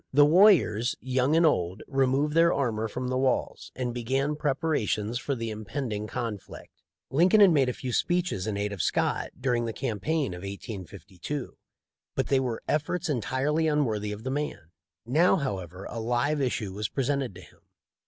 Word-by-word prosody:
The 145 +2 +6
warriors, 155 - +5
young 130 +3 +1
and 165 +1 +5
old, 95 - +1
removed 135 +2 +1
their 165 +1 +5
armor 110 -5 0
from 125 +3 -4
the 130 0 0
walls, 130 -1 -1
and 125 -2 -2
began 135 +5 -1
preparations 135 -7 -1
for 140 - -2
the 115 -2 -4
impending 110 0 -4
conflict. 115 -4 -6 0.3
Lincoln 180 +9 +5
had 200 -3 +8
made 140 -5 +3
a - - -1
few 125 0 -5
speeches 175 - 0
in 105 -2 -2
aid 105 0 -2
of 95 - -3
Scott - - 0
during 125 -2 0
the 115 - -3
campaign 135 - -1
of 90 - -7
1852, 100 - -7 0.6
but - - -1
they 135 - +4
were 125 -3 -3
efforts 160 +4 -1
entirely 145 +4 0
unworthy 110 -9 0
of 105 +1 -7
the 130 - -3
man. 140 - -4 0.3
Now, 155 +11 +4
however, 95 - -4
a 115 - -6
live 125 +6 0
issue 115 -7 -1
was 105 +1 -3
presented 135 -4 -1
to 90 - -10
him. 85 - -18
130 Hz, 170 wpm, -27 LUFS, 110-145 Hz, 0.6 s, had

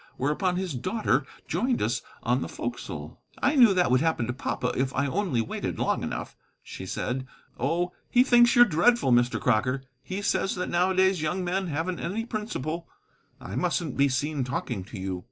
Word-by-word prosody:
Whereupon 150 +7 0
his 185 -3 -2
daughter 150 - 0 0.2
joined 240 - 0
us - - 0 0.2
on - - +1
the - - -4
forecastle. - - -6 0.2
"I - - +2
knew 240 -6 +7
that 180 -9 +3
would 130 +1 +4
happen 160 -7 +1
to 120 - -2
papa 125 -1 -2
if 130 0 0
I 140 - +1
only 150 - 0
waited 110 - -4
long - - 0
enough," - - -5 0.3
she 95 - -8
said. 130 +6 -3 0.3
"Oh, 175 +2 0 0.2
he 245 - +5
thinks 240 -2 +5
you're 240 0 +9
dreadful, 235 - +3
Mr. 120 0 +3
Crocker. 125 +3 +1 0.2
He 195 +6 -5
says 195 0 +1
that 180 - -3
nowadays 185 0 +3
young 175 +4 -1
men 185 +2 -1
haven't 165 +3 -2
any 220 +6 -3
principle. 175 - -4 0.5
I - - -7
mustn't 170 -6 -1
be 140 0 +3
seen 140 +2 -1
talking 120 -5 -3
to 105 0 -8
you." 95 -1 -3
165 Hz, 180 wpm, -27 LUFS, 130-190 Hz, 0.5 s, you're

